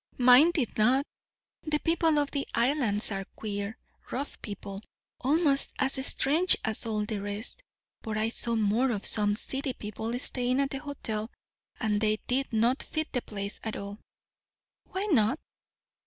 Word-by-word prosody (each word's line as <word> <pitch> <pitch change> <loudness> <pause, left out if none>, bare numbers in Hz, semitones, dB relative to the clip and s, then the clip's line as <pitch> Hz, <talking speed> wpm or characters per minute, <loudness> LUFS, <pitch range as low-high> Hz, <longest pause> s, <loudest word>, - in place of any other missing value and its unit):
"Mine 250 +6 +7
did 280 -11 -1
not. 255 +6 +4 0.6
The 305 -2 0
people 325 -1 +1
of 290 -1 +1
the 280 -1 -3
Islands 235 -4 +2
are 195 -1 -2
queer, 205 +1 -4 0.3
rough 275 +4 -5
people, 200 -1 -7 0.4
almost 285 +1 +2
as 265 0 0
strange 310 +7 +6
as 220 +1 -1
all 215 -1 -1
the 210 -1 -3
rest; 205 - -3 0.4
but 215 -1 -4
I 220 +1 +1
saw 235 0 0
more 220 +4 +2
of 210 -4 -3
some 205 -1 +3
city 265 +4 -3
people 220 +2 -5
staying 250 +1 0
at 275 -1 0
the 270 - -3
hotel; 230 -7 -5 0.5
and 210 -2 0
they 215 -1 +2
did 270 +2 -1
not 235 +4 +2
fit 315 0 -4
the 250 - 0
place 200 -2 -6
at 220 - -4
all." 200 +1 -7 0.9
"Why 380 +2 -2
not?" 255 +1 +3
240 Hz, 155 wpm, -28 LUFS, 215-275 Hz, 0.9 s, Mine